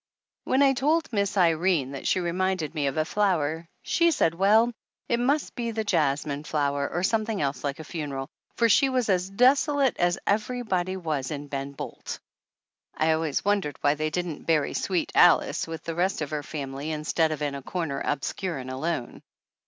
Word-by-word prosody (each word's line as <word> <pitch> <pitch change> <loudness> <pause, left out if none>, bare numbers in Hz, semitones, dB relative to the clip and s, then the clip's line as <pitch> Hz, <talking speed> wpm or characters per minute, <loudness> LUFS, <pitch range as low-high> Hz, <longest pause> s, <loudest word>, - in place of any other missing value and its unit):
When 265 +2 +3
I 270 -1 +5
told 310 +5 +1
Miss 200 -1 0
Irene 165 -5 +2
that 135 - -5
she - - +2
reminded 180 -2 -1
me 145 -3 0
of 135 - -2
a 155 - +2
flower, 165 -5 0 0.2
she 340 0 +3
said 165 - +2
well, 215 +6 +4 0.3
it 235 - +1
must 280 +5 +1
be 235 -2 -3
the 220 -1 -2
jasmine 150 -6 0
flower, 145 -2 -1
or 175 - -2
something 220 +1 0
else 140 -2 -2
like 140 -1 -2
a 160 - -8
funeral, 145 -4 -5 0.3
for 235 - +3
she 265 +5 +4
was 255 -4 0
as 185 -1 +1
desolate 270 +5 +3
as 175 0 +2
everybody 200 -4 -1
was 155 -7 -2
in 145 -1 -6
Ben 140 0 -4
Bolt. - - -7 0.8
(I 160 +1 +3
always 160 -1 0
wondered 200 -9 0
why 145 - +4
they 155 +1 -2
didn't 170 -2 -4
bury 155 -3 +2
"Sweet 180 -3 -1
Alice" 175 - +4
with 165 -1 -6
the 165 - -4
rest 175 0 0
of 145 - -6
her 150 -1 -2
family 140 0 -5
in 155 -1 -3
stead 160 +1 +1
of 150 -1 -3
in 145 -1 -1
a 140 - -5
corner 150 -2 -3
obscure 165 +4 -2
and 130 0 -6
alone.) 135 -1 -3
170 Hz, 190 wpm, -26 LUFS, 145-205 Hz, 0.8 s, I